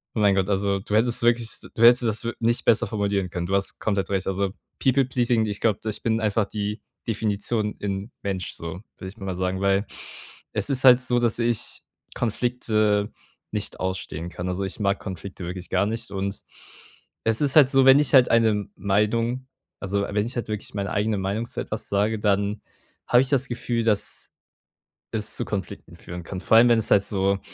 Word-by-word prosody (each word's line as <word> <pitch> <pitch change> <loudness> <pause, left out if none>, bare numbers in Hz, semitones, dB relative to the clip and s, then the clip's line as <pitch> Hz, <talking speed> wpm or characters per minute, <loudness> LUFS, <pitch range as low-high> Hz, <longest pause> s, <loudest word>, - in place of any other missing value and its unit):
Oh 110 - -1
mein 100 -2 +4
Gott, 95 +1 0
also, 100 0 +1
du 100 - -7
hättest 120 +1 +2
wirklich 120 -1 +3 0.3
du - - -5
hättest 120 +1 +7
das 110 0 0
wir 120 - -2
nicht 115 +1 0
besser 115 - +4
formulieren 100 -3 -1
können. 85 0 -4
Du 95 - 0
hast 100 0 -1
komplett 100 -3 -1
recht. 95 -1 -1
Also 95 0 -1 0.3
People 135 0 +3
Pleasing 120 -3 +1
ich 105 -2 -4
glaube, 110 -3 +2
ich 105 - -5
bin 115 -1 +1
einfach 105 -1 +1
die 105 +1 -4 0.3
Definition 105 0 -1
in 100 +3 -4
Mensch 95 -4 -3
so, 85 +2 -7 0.2
würde 95 - -8
ich 105 - -14
mal 95 -3 -4
sagen, 95 +1 -2
weil 100 +1 +2 0.7
es - - 0
ist 135 -1 +2
halt 125 -1 +8
so, 125 -1 +1
dass 120 -1 +1
ich 120 -1 -2 0.3
Konflikte 110 -3 0 0.4
nicht - - -4
ausstehen 95 -3 -4
kann. 90 +1 -5
Also, 90 +2 -2
ich 95 - -6
mag 100 -1 +1
Konflikte 95 -1 -7
wirklich 90 0 -7
gar 95 +2 +2
nicht 110 -2 -4
und 100 0 -4 0.8
es 110 0 +2
ist 140 -2 +2
halt 145 -4 +7
so, 135 -1 +4
wenn 135 +2 +8
ich 150 - 0
halt 130 -3 +7
eine 110 -3 +3
Meinung 115 +6 0 0.4
also, 100 +1 -1
wenn 105 +1 -1
ich 125 - -7
halt 120 - -3
wirklich 105 -1 -5
meine 100 -2 -2
eigene 105 +1 0
Meinung 100 +4 -2
zu - - -6
etwas - - -5
sage, 105 +2 +1
dann 100 0 0 0.5
habe 120 +1 +5
ich 130 - -6
das 135 -2 +2
Gefühl, 120 -1 -2
dass 105 -3 -1 0.8
es 110 -1 -2
zu - - -2
Konflikten 100 -3 -6
führen 90 0 -8
kann. 90 +1 -6
Vor 110 - +4
allem, 120 +1 +7
wenn 120 - +5
es 110 - -2
halt 100 - +5
so 100 -1 0
105 Hz, 200 wpm, -24 LUFS, 100-115 Hz, 0.8 s, halt